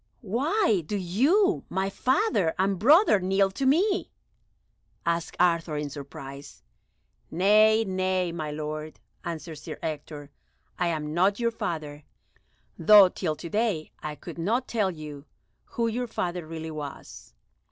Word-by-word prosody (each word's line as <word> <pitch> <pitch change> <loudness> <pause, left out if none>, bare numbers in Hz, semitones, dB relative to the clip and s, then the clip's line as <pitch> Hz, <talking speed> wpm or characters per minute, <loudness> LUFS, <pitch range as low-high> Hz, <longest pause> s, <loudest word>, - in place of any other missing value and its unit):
"Why 255 - +1
do 205 +7 -3
you, 280 - +2
my 190 +1 -1
father 255 - +1
and 190 0 +1
brother, 290 - +6
kneel 195 +1 +2
to 265 +7 -1
me?" 380 +8 +2 1.0
asked 170 0 -1
Arthur 170 -3 +2
in 150 -1 -4
surprise. 140 0 -10 0.7
"Nay, 215 +5 +4
nay, 185 -2 0
my 155 -3 -4
lord," 155 +1 -5 0.2
answered 165 -2 -6
Sir - - -8
Ector, 150 -2 -6 0.5
"I 180 - +1
am 155 -2 -2
not 190 +5 +2
your 235 -1 +1
father, 155 -8 -5 0.8
though 200 +2 +8
till 165 -4 -3
to 170 - -8
day 210 -8 -1
I 150 -1 -5
could 170 +3 -10
not 230 +9 0
tell 215 -5 0
you 150 -4 -8 0.4
who 230 -1 -2
your 245 +2 -2
father 175 -6 -3
really 160 0 -6
was. 145 - -9
180 Hz, 135 wpm, -26 LUFS, 155-215 Hz, 1.0 s, though